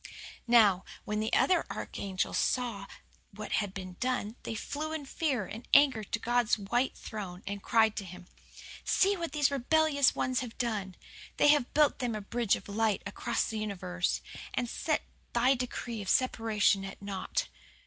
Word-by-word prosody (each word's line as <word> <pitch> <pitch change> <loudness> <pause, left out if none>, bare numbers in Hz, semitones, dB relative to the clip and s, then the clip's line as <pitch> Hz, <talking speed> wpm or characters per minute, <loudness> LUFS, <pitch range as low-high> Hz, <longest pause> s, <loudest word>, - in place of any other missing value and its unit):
"Now, 210 -6 +5 0.2
when 210 0 -1
the 220 +1 -1
other 360 -3 +4
archangels 190 -2 -3
saw 230 -6 -1 0.5
what 215 +1 -7
had 205 -2 -4
been 185 -2 -8
done 250 -4 -1
they 225 - -5
flew 305 +7 -4
in 310 -3 -4
fear 270 - -1
and 220 +6 -9
anger 275 -6 +5
to 210 - -2
God's 240 -1 +2
white 240 +6 -1
throne, 190 -5 -7
and 200 0 -4
cried 220 -1 +3
to 200 - -3
Him, 180 0 -10 0.6
"'See 395 +1 +3
what 340 -3 -4
these 295 -2 +2
rebellious 285 +1 +3
ones 255 0 0
have 245 -3 -6
done! 210 -7 -2 0.4
They 290 - +5
have 290 -4 +3
built 300 -1 +4
them 240 -3 -1
a 215 - -4
bridge 230 +1 +1
of - - -10
light 210 0 0
across 205 - -1
the 220 - -3
universe, 185 -4 -2 0.3
and 245 - 0
set - - -1 0.3
Thy 245 +3 +4
decree 240 -3 -4
of 195 - -5
separation 220 -5 +2
at 195 -1 -7
naught. 195 -1 -3
225 Hz, 170 wpm, -30 LUFS, 200-255 Hz, 0.6 s, Now